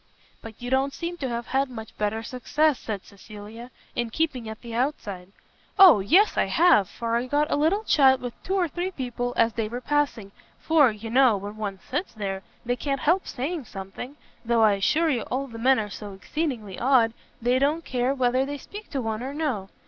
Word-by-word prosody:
"But 225 Hz, -2 st, -11 dB
you 245 Hz, -, -4 dB
don't 270 Hz, +1 st, +1 dB
seem 345 Hz, +1 st, -4 dB
to 270 Hz, -5 st, -3 dB
have 235 Hz, 0 st, -3 dB
had 270 Hz, +1 st, 0 dB
much 225 Hz, -3 st, -9 dB
better 215 Hz, +1 st, -2 dB
success," 290 Hz, +4 st, 0 dB
said 205 Hz, -4 st, -5 dB
Cecilia, 215 Hz, +4 st, -11 dB, 0.3 s
"in 240 Hz, -1 st, -1 dB
keeping 255 Hz, -4 st, -2 dB
at 220 Hz, -, -8 dB
the 235 Hz, -2 st, -8 dB
outside." 205 Hz, -8 st, -3 dB, 0.5 s
"O 370 Hz, -, +9 dB
yes 355 Hz, -, +4 dB
I -, -, +3 dB
have, 325 Hz, -, +4 dB
for 230 Hz, 0 st, -2 dB
I 245 Hz, +2 st, -2 dB
got 295 Hz, +3 st, +1 dB
a -, -, +3 dB
little 325 Hz, +9 st, +2 dB
chat 265 Hz, -8 st, +5 dB
with 245 Hz, -1 st, -5 dB
two 380 Hz, -, -2 dB
or 365 Hz, -3 st, +2 dB
three 350 Hz, +4 st, -3 dB
people 245 Hz, -6 st, -3 dB
as 230 Hz, -1 st, +3 dB
they 225 Hz, -2 st, -2 dB
were 240 Hz, +3 st, -5 dB
passing, 260 Hz, -7 st, -1 dB, 0.3 s
for, 310 Hz, -5 st, +4 dB
you 220 Hz, +1 st, -7 dB
know, 250 Hz, -4 st, +5 dB
when 205 Hz, +2 st, -7 dB
one 205 Hz, -3 st, -4 dB
sits 320 Hz, +9 st, -3 dB
there, 195 Hz, -2 st, -3 dB, 0.2 s
they 245 Hz, +1 st, 0 dB
can't 275 Hz, 0 st, -2 dB
help 350 Hz, +5 st, +2 dB
saying 290 Hz, +3 st, -3 dB
something; 195 Hz, +7 st, -8 dB, 0.3 s
though 235 Hz, -1 st, +2 dB
I 215 Hz, -2 st, +5 dB
assure 305 Hz, +12 st, +2 dB
you 245 Hz, -4 st, 0 dB
all 265 Hz, +2 st, -1 dB
the 230 Hz, -4 st, -9 dB
men 260 Hz, +3 st, +4 dB
are 210 Hz, -, -2 dB
so 205 Hz, -1 st, -7 dB
exceedingly 225 Hz, -, -4 dB
odd 240 Hz, -3 st, +4 dB, 0.3 s
they 245 Hz, +2 st, +2 dB
don't 300 Hz, +4 st, +1 dB
care 255 Hz, +2 st, 0 dB
whether 255 Hz, 0 st, +2 dB
they 285 Hz, +1 st, -4 dB
speak 415 Hz, +9 st, -10 dB
to 270 Hz, -4 st, -3 dB
one 220 Hz, 0 st, -2 dB
or 270 Hz, +3 st, -5 dB
no. 255 Hz, -12 st, -2 dB
245 Hz, 210 wpm, -25 LUFS, 220-290 Hz, 0.5 s, O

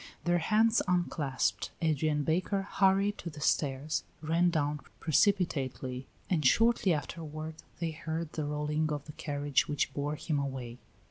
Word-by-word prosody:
Their 175 Hz, 0 st, +2 dB
hands 220 Hz, +6 st, +3 dB
unclasped, 165 Hz, -7 st, 0 dB
Adrian 155 Hz, -2 st, +1 dB
Baker 185 Hz, +5 st, 0 dB
hurried 195 Hz, +1 st, +2 dB
to 170 Hz, -, -5 dB
the 150 Hz, -2 st, -10 dB
stairs, 140 Hz, +1 st, 0 dB, 0.2 s
ran 165 Hz, +3 st, +2 dB
down 150 Hz, -3 st, 0 dB, 0.2 s
precipitately, 135 Hz, -7 st, +1 dB, 0.2 s
and 165 Hz, -5 st, +1 dB
shortly 225 Hz, -, +4 dB
afterward 155 Hz, +1 st, -4 dB, 0.2 s
they 165 Hz, -1 st, -2 dB
heard 160 Hz, 0 st, -4 dB
the 155 Hz, -, -2 dB
rolling 150 Hz, +1 st, -1 dB
of 145 Hz, -2 st, -3 dB
the 150 Hz, -, -8 dB
carriage 145 Hz, -2 st, 0 dB
which 145 Hz, -2 st, -1 dB
bore 145 Hz, +2 st, -2 dB
him 150 Hz, 0 st, -1 dB
away. 130 Hz, -3 st, -4 dB
155 Hz, 140 wpm, -31 LUFS, 145-175 Hz, 0.2 s, shortly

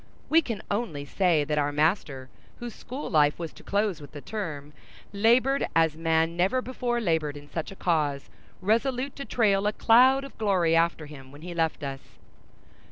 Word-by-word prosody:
We 325 Hz, +1 st, +5 dB
can 230 Hz, -8 st, -5 dB
only 190 Hz, -10 st, -2 dB
say 170 Hz, 0 st, +2 dB
that 150 Hz, +1 st, -1 dB
our 145 Hz, 0 st, 0 dB
master, 145 Hz, -4 st, 0 dB, 0.3 s
whose 240 Hz, -2 st, -7 dB
school 260 Hz, +4 st, -7 dB
life 150 Hz, -3 st, +3 dB
was 165 Hz, -2 st, -6 dB
to -, -, -15 dB
close 200 Hz, -5 st, -1 dB
with 145 Hz, -, -12 dB
the 145 Hz, -, -7 dB
term, 150 Hz, -9 st, -6 dB, 0.4 s
labored 245 Hz, +6 st, +3 dB
as 165 Hz, -1 st, +3 dB
man 165 Hz, 0 st, +1 dB
never 190 Hz, +9 st, +2 dB
before 250 Hz, -1 st, -2 dB
labored 160 Hz, -8 st, -1 dB
in 145 Hz, 0 st, -12 dB
such 160 Hz, +1 st, -5 dB
a -, -, -10 dB
cause, 150 Hz, -7 st, -1 dB, 0.3 s
resolute 250 Hz, +6 st, 0 dB
to 275 Hz, -, -6 dB
trail 205 Hz, -4 st, +2 dB
a 210 Hz, -, 0 dB
cloud 255 Hz, +5 st, +5 dB
of 275 Hz, -, -10 dB
glory 185 Hz, -6 st, +2 dB
after 165 Hz, -1 st, +1 dB
him 135 Hz, -3 st, -12 dB
when 145 Hz, +2 st, -13 dB
he 175 Hz, 0 st, -6 dB
left 160 Hz, -2 st, -1 dB
us. 135 Hz, -1 st, -7 dB
170 Hz, 180 wpm, -27 LUFS, 150-225 Hz, 0.4 s, We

